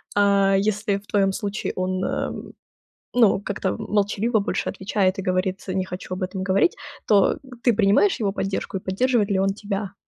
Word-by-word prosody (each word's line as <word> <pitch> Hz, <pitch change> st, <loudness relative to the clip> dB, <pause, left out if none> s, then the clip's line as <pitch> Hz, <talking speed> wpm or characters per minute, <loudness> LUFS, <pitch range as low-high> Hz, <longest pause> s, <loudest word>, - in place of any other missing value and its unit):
а, 200 Hz, -1 st, +4 dB
если 205 Hz, 0 st, 0 dB
в 200 Hz, 0 st, -14 dB
твоём 195 Hz, -2 st, +2 dB
случае 205 Hz, -1 st, -3 dB
он, 185 Hz, 0 st, -1 dB
э, -, -, -2 dB, 0.8 s
ну, 225 Hz, -5 st, +4 dB
как-то 195 Hz, -2 st, -2 dB
молчаливо 210 Hz, +2 st, 0 dB
больше 200 Hz, -, -2 dB
отвечает 190 Hz, 0 st, 0 dB
и 195 Hz, -, -2 dB
говорит: 185 Hz, +1 st, -1 dB
"Не 185 Hz, 0 st, -1 dB
хочу 185 Hz, 0 st, -7 dB
об 185 Hz, -, -5 dB
этом 185 Hz, 0 st, -4 dB
говорить", 195 Hz, -, +2 dB, 0.3 s
то, 200 Hz, -3 st, +4 dB
э, -, -, -9 dB, 0.3 s
ты 240 Hz, -, +4 dB
принимаешь 210 Hz, -, +3 dB
его 205 Hz, -3 st, 0 dB
поддержку, 195 Hz, 0 st, -3 dB
и -, -, -5 dB
поддерживает 215 Hz, +3 st, +1 dB
ли 190 Hz, -, +2 dB
он 195 Hz, 0 st, +1 dB
тебя? 200 Hz, -1 st, -4 dB
195 Hz, 180 wpm, -23 LUFS, 190-210 Hz, 0.8 s, а